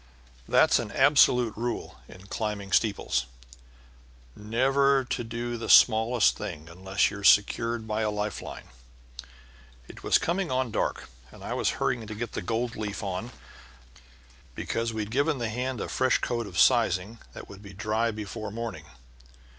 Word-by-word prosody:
That's - - +4
an - - -5
absolute 125 -5 +4
rule 120 +2 -4
in 90 +1 -14
climbing 100 -1 -4
steeples 95 - +1 1.1
never 135 +5 +2
to 120 - -3
do 120 +1 -4
the 115 - -6
smallest 115 +1 +5
thing 85 -7 -7
unless 95 +4 0
you're 100 0 -8
secured 115 +3 +3
by 110 0 -1
a 110 - +1
life 105 -1 -3
line. - - -9 1.2
It - - -12
was - - +3
coming 175 +2 -1
on 130 -2 -1
dark, - - -2 0.2
and - - -14
I - - -4
was - - -1
hurrying 115 -3 -1
to 110 - -6
get 115 +1 -5
the - - -4
gold 115 +4 -2
leaf 105 0 -5
on, 95 +4 -4 1.3
because 115 0 -2
we'd 110 -1 -4
given 145 +4 +1
the 115 -3 -2
hand 125 +2 -3
a - - -3
fresh 130 0 +2
coat 120 -2 -3
of 90 - -8
sizing 115 -2 +3
that - - -10
would 100 0 -12
be 100 -2 -11
dry 110 +4 -1
before 110 0 -6
morning. 110 -7 -6
110 Hz, 155 wpm, -27 LUFS, 105-120 Hz, 1.3 s, smallest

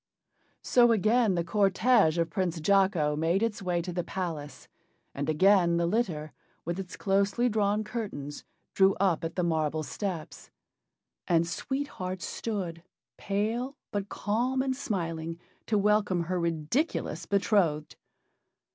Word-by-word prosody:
So 240 -1 +5
again 220 -1 +3
the 170 - 0
cortége 195 0 +3
of 165 -1 0
Prince 180 -3 -1
Jocko 185 -4 +2
made 165 +7 +1
its 225 -3 -1
way 175 -2 -1
to 180 0 -5
the 175 0 -1
palace, 165 -7 -5 0.5
and 145 +2 -3
again 175 +1 +4
the 170 - +1
litter, 170 -7 -1 0.3
with 170 +3 -3
its 185 -2 -7
closely 200 +5 +1
drawn 210 -1 +1
curtains, 205 - -5 0.3
drew 195 0 +4
up 185 -4 +1
at 165 0 -4
the 180 - 0
marble 155 -2 0
steps. 180 -1 -5 0.8
And 170 -1 +3
Sweet 270 +11 -3
Heart 185 -5 -5
stood, 185 -7 -4 0.4
pale, 225 +7 -2
but 200 -1 -3
calm 250 +5 0
and 265 -1 -1
smiling, 165 - -3 0.3
to 215 - +2
welcome 205 -3 +2
her 180 +2 -2
ridiculous 170 - -1
betrothed. 190 -7 +1
190 Hz, 135 wpm, -28 LUFS, 165-210 Hz, 0.8 s, So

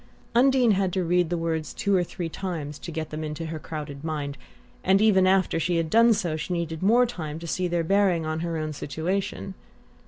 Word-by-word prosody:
Undine 250 -1 +4
had 195 -2 +1
to 185 - 0
read 175 0 +2
the 175 - -1
words 165 -2 -2
over - - -16
two 200 -1 +2
or 180 - +3
three 175 0 -5
times 160 -4 -5
to - - -8
get 155 -1 -4
them 155 +1 -4
into 155 +1 -4
her 160 0 -5
crowded 150 -3 -7
mind; 150 -3 -3 0.5
and 190 +1 +4
even 195 -3 +5
after 190 -3 +2
she 170 +1 0
had 165 -1 -1
done 230 +1 +6
so 180 -7 0
she 160 +3 -3
needed 165 -2 -3
more 235 +6 +5
time 160 -10 -5
to 165 - -8
see 180 +2 -1
their 170 -1 0
bearing 185 -2 +2
on 155 0 -2
her 165 0 -2
own 155 -1 -3
situation. 185 +7 -3
170 Hz, 220 wpm, -26 LUFS, 155-190 Hz, 0.5 s, done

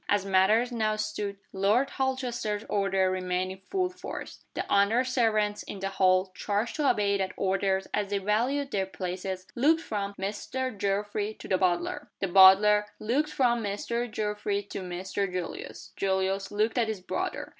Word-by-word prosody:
As 205 -1 +2
matters 200 +6 +3
now 215 -2 0
stood, 210 -2 -3 0.2
Lord 205 +8 +2
Holchester's 245 -6 -2
order 195 -2 +1
remained 185 0 -1
in 190 - -9
full 370 -1 0
force. - - -8
The - - -2
under 200 +5 +3
servants 220 -5 +1
in - - -7
the 195 0 -2
hall 185 -1 +2
(charged 210 +7 -2
to 295 -3 +3
obey 200 -1 +2
that 190 -1 -2
order 195 0 +1
as 205 -1 0
they 200 - 0
valued 240 +8 0
their 195 -2 0
places) 185 +1 -5
looked 315 +6 +3
from 200 -7 -4
"Mr. 220 +6 -3
Geoffrey" 205 +2 -1
to - - -10
the 185 - +1
butler, 175 -2 0
The 195 - -1
butler 195 +3 +7
looked 265 +8 0
from 240 -3 +2
"Mr. 235 +4 -2
Geoffrey" 210 -1 -2
to - - -4
"Mr. 185 +2 -3
Julius." 180 -2 -6
Julius 190 0 0
looked 215 +4 0
at 230 - +2
his 215 -4 -4
brother. - - -3
205 Hz, 165 wpm, -28 LUFS, 190-225 Hz, 0.2 s, butler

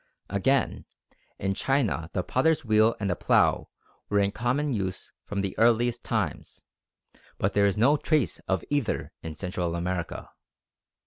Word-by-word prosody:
Again, 135 +7 +1 0.5
in 95 0 -1
China 115 - 0
the 90 - -1
potter's 150 - +1
wheel 110 +1 +4
and 100 - -1
the 90 - 0
plough - - +2 0.4
were 105 - +1
in 100 0 +2
common 130 +6 0
use 95 -4 -3
from 100 -1 -2
the 100 -1 -3
earliest 120 +1 +3
times, - - -3 0.7
but 95 - 0
there 100 0 +4
is 100 - 0
no 135 +8 +4
trace 145 - 0
of - - 0
either 145 -5 -1
in 80 -1 -6
Central 90 0 -3
America. 85 0 -4
105 Hz, 145 wpm, -27 LUFS, 95-125 Hz, 0.7 s, wheel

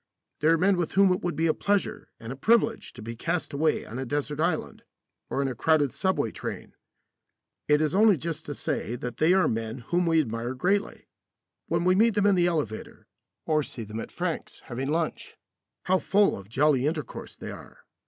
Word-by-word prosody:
They 150 - +1
are 165 +1 +5
men 190 +3 +3
with 175 -2 -2
whom 195 0 +5
it 180 - -3
would 175 -1 -2
be 165 - +1
a 160 - +3
pleasure 200 +3 -1
and 115 +3 -6
a - - -9
privilege 225 - +2
to 120 - -10
be 115 +1 -6
cast 165 +7 -2
away 155 +2 +1
on 120 +4 -6
a 135 - -3
desert 145 +2 -2
island 160 0 -1 0.5
or 140 - 0
in - - 0
a 130 - -2
crowded 145 +2 +2
subway 190 - 0
train. - - -6 0.9
It 150 0 +4
is 155 +1 +1
only 205 -1 +5
just 165 +1 -5
to 145 - -4
say 120 - -2
that 125 -1 -6
they 160 +3 +4
are 190 0 +4
men 115 +1 -2
whom 175 +8 0
we 165 -1 +4
admire 120 -2 -2
greatly. 195 +9 -1 0.6
When 170 +1 0
we 185 +1 +4
meet 220 +3 +4
them 205 -1 +2
in 205 - +5
the 175 -2 +3
elevator, 150 -11 -3 0.4
or 155 -1 +2
see 125 -4 -7
them 110 +1 -6
at - - -7
Frank's 175 -2 -4
having 130 +2 -4
lunch, 160 +1 -2 0.5
how 185 0 +2
full 200 +2 +3
of 100 0 -11
jolly 135 +1 +3
intercourse 150 -4 -5
they - - -7
are. - - -13
155 Hz, 205 wpm, -27 LUFS, 130-180 Hz, 0.9 s, are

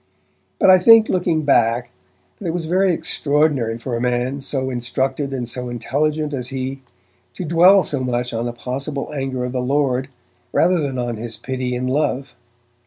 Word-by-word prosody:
But 190 - +5
I 185 - +7
think, 225 +3 +7
looking 175 -4 0
back, 120 -3 +2 0.5
that 195 - -5
it 165 - -1
was 170 -2 -2
very 185 +3 +2
extraordinary 145 -8 +1
for 120 +1 -4
a 115 - -3
man, 125 +2 -1
so 130 -1 -1
instructed 130 +3 -2
and 125 -3 -3
so 125 +1 -4
intelligent 150 +5 -1
as 125 -3 -3
he, 135 0 -4 0.5
to 185 - -5
dwell 175 +4 +6
so 135 -3 -1
much 125 -1 -2
on 115 +1 -2
the - - -2
possible 140 +4 -4
anger 135 -3 -3
of 125 - -4
the 125 0 -2
Lord, 135 0 0 0.4
rather 180 +1 +3
than 140 -4 -2
on 120 -2 -3
his 115 0 -6
pity 130 -1 -3
and 125 +1 -2
love. 135 0 -1
135 Hz, 175 wpm, -20 LUFS, 125-150 Hz, 0.5 s, I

